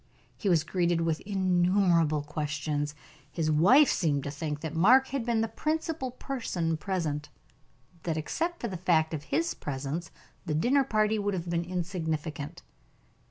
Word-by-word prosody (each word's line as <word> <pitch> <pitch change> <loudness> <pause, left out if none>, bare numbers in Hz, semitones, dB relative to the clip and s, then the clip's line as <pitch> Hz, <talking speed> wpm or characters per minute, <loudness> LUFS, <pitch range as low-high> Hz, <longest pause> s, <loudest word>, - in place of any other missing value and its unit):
He 205 - -1
was 165 -4 +4
greeted 175 0 +1
with 165 -1 0
innumerable 180 -5 +2
questions; 150 0 -3 0.4
his 155 -2 0
wife 205 - +6
seemed 145 -6 +1
to 140 - -4
think 150 0 -4
that 160 -2 -4
Mark 250 +11 +5
had 275 -2 -2
been 230 -1 +1
the 225 - +1
principal 310 +3 -2
person 230 -11 -2
present: 155 -4 -3 0.7
that 160 -1 -2
except 335 - -2
for 235 - -1
the 190 -4 -5
fact 165 -3 +2
of 150 -1 -4
his 335 - 0
presence, 145 +4 -4 0.3
the 155 - -2
dinner 260 - +3
party 215 -3 +1
would 205 -1 -1
have 170 -1 -4
been 170 0 0
insignificant. 165 -3 -4
170 Hz, 155 wpm, -29 LUFS, 155-215 Hz, 0.7 s, wife